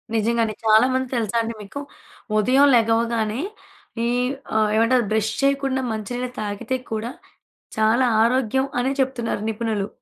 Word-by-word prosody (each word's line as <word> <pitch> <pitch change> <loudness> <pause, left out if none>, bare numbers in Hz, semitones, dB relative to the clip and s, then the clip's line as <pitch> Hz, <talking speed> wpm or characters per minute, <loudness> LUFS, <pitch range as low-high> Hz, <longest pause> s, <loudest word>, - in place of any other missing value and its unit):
నిజంగానే. 225 0 +1
చాలా 220 +3 +6
మంది 260 0 0
తెలుసా 230 -1 -1
అండి 230 0 -3
మీకు? 220 +8 -7 0.6
ఉదయం 260 +6 +4
లెగవగానే 230 +1 +1 0.6
ఈ - - +1 0.5
ఆహ్, 215 -1 +3
ఏమంటారు 230 +1 +3
బ్రష్ 220 0 +1
చేయకుండా 275 -1 +1
మంచి 215 +1 -5
నీళ్ళు 250 0 -3
తాగితే 210 +5 -3 0.2
కూడా, 220 +3 -3 0.7
చాలా 225 +4 +3 0.2
ఆరోగ్యం 260 +2 +1
అని 265 +2 0
చెప్తున్నారు 240 -5 -2
నిపుణులు. 215 -2 -2
230 Hz, 130 wpm, -22 LUFS, 220-255 Hz, 0.7 s, చాలా